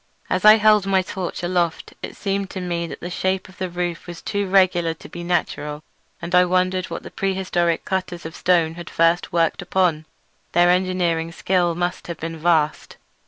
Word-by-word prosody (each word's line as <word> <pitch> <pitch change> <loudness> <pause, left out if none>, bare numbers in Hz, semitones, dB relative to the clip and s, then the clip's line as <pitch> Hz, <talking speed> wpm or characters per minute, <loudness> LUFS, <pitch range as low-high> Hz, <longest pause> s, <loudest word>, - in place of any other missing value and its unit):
As 185 - +1
I 215 0 +10
held 210 -2 +4
my 190 -1 +3
torch 185 -1 -5
aloft 175 -2 -1
it - - -7
seemed 195 -1 -2
to 190 - -6
me 170 -2 -2
that - - -9
the 175 - -5
shape 190 +1 -1
of 190 +2 -18
the 185 -1 -2
roof 175 0 -4
was 175 -1 -7
too 200 -1 -2
regular 180 -4 +3
to - - -13
be 175 - -8
natural, 150 -4 -2 0.4
and 170 +1 -6
I 180 0 +7
wondered 185 +1 +1
what - - -6
the - - -9
prehistoric 185 -3 0
cutters 180 -3 -3
of 160 - -7
stone 170 -3 +2
had 170 -1 -9
first 165 +1 +2
worked 170 +2 +1
upon. 175 -4 0 0.5
Their 175 0 +5
engineering 180 -3 0
skill 175 0 +1
must 175 +1 -3
have 170 - -5
been 165 0 -5
vast. 155 -2 +1
175 Hz, 190 wpm, -22 LUFS, 170-185 Hz, 0.5 s, I